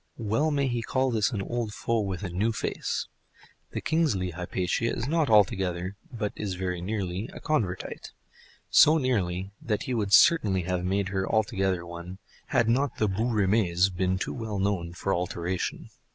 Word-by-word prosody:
Well 115 +8 +1
may 140 -2 +1
he 120 -2 -1
call 130 +3 0
this 110 -3 +2
an 100 -5 -2
old 120 -1 -3
foe 115 -1 0
with 95 -2 -3
a 95 - -3
new 105 +6 +1
face! - - -2 0.6
The - - -4
Kingsley 140 - +1
Hypatia 90 +5 -1
is 115 - -3
not 160 -2 +1
altogether, 95 -3 +2 0.2
but 110 -4 -3
is 100 -3 -3
very 90 -1 -3
nearly 95 0 -3
a - - -8
Convertite; 100 -12 -2 0.6
so 155 +2 +7
nearly 100 - -1
that 105 -3 -1
he 130 - -3
would 105 -4 -1
certainly 100 - +5
have 90 0 -1
made 95 +2 0
her 95 -1 -2
altogether 95 -4 +1
one, 85 +2 -8 0.3
had 125 -5 +2
not 135 +5 +1
the 110 - +2
bouts 110 +5 0
rime's 95 -4 +3
been 95 +1 0
too - - -3
well 110 -4 -4
known 95 -4 -1
for 95 +2 -1
alteration. 90 +1 -3
100 Hz, 170 wpm, -27 LUFS, 90-115 Hz, 0.6 s, so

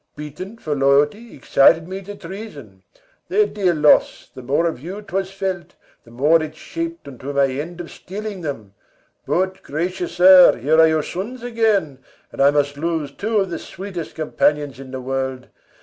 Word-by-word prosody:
Beaten 165 +9 -8
for 155 -8 -3
loyalty 145 +11 +2
Excited 160 +4 +4
me 190 +1 -6
to 205 +1 -9
treason. 165 - -10 0.5
Their 425 0 +3
dear 190 - 0
loss, 150 -1 +3
The 130 - -9
more 140 +7 0
of 165 -7 -2
you 185 +9 -7
'twas 190 -1 -3
felt, 190 -2 -4 0.3
the - - -17
more 145 +7 +3
it 155 0 -6
shap'd 335 - -6
Unto 140 +1 -7
my 140 -1 +3
end 150 +6 -5
of 175 - -7
stealing 200 0 -7
them. 115 - -6 0.5
But, 185 +1 0
gracious 175 +4 -3
sir, 180 0 +8
Here 150 +7 +2
are 160 - +7
your 160 -1 +1
sons 230 +7 -6
again, 215 - 0 0.3
and - - -4
I 140 - +7
must 145 -1 0
lose 160 -2 -2
Two 215 +9 -2
of 195 -3 0
the 170 - -3
sweet'st 185 -3 -7
companions 150 -3 0
in 135 -1 -10
the 130 0 -6
world. 130 0 -4
165 Hz, 175 wpm, -20 LUFS, 140-190 Hz, 0.5 s, sir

